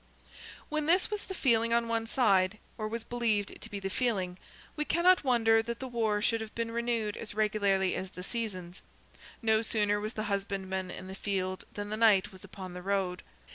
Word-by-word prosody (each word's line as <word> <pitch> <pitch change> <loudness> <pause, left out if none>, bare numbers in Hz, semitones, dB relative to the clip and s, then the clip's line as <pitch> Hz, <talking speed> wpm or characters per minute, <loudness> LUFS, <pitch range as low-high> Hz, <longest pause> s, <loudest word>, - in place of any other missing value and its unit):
When 305 0 -1
this 360 +5 +3
was 420 -1 -3
the 380 - -6
feeling 230 -5 +3
on 235 0 +2
one 225 0 -1
side, 200 -5 +3 0.2
or 215 -2 -3
was 225 +1 -4
believed 225 -4 -1
to - - -8
be 200 - -4
the 195 - -3
feeling, 190 -7 0 0.4
we 300 - 0
cannot 350 +3 +4
wonder 225 -4 +4
that 235 +1 -4
the 265 - -4
war 220 -4 0
should 230 -1 +2
have 220 -1 -7
been 230 0 -2
renewed 230 -3 -1
as 215 -2 -7
regularly 200 -3 +2
as 190 - -3
the 180 -1 -9
seasons. 190 -5 -4 0.6
No 220 -1 +4
sooner 210 -2 +1
was 215 +2 -4
the 215 - -3
husbandman 195 -2 -2
in 185 - -7
the 190 - -7
field 190 -2 -2
than 205 0 -4
the 215 - -2
knight 210 -3 +5
was 190 -1 -12
upon 190 -2 -8
the 180 - -7
road. 190 -1 -1
215 Hz, 200 wpm, -31 LUFS, 195-230 Hz, 0.6 s, knight